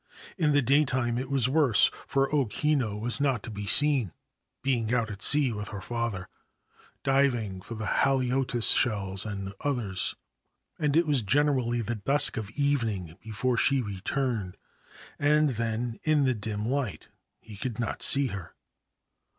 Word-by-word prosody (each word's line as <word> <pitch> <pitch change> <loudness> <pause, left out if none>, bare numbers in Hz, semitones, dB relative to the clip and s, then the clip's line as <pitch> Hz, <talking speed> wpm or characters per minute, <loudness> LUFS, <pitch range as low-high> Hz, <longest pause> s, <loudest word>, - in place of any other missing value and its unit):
In 160 -6 +2
the 145 -1 +3
daytime 130 -3 +2
it 130 +1 -5
was 135 -3 +2
worse, 135 -6 +4 0.2
for 135 0 +2
O 140 -5 +2
Kinu 125 -4 0
was 120 +5 -1
not 135 -7 +1
to - - -7
be 105 -1 -6
seen, 135 - +2 0.5
being 120 -5 0
out 115 -3 0
at 100 -1 -9
sea 140 -4 +3
with 105 0 -5
hei 100 - -6
father, 115 -4 -3 0.8
diving 120 -8 +1
for 115 - -8
the 110 0 -5
haliotis 130 -1 +2
shell 100 -5 0
and 100 -2 -5
others; 115 -10 -1 0.6
and 150 0 +1
it 170 - +4
was 145 -5 +2
generally 125 0 +1
the 115 +2 -2
dusk 140 +7 +2
of 110 -4 -4
evening 115 - -1
before 115 +3 -1
she 135 +6 +3
returned, 105 -1 -3 0.6
and 150 +1 +3
then, 115 -1 -2
in 155 -2 +3
the 130 -1 +2
dim 105 -1 -4
light, 125 - -3 0.3
he 110 - -12
could 120 +1 -5
not 115 - -3
see 140 0 +2
her. 100 -8 -6
120 Hz, 155 wpm, -28 LUFS, 105-140 Hz, 0.8 s, worse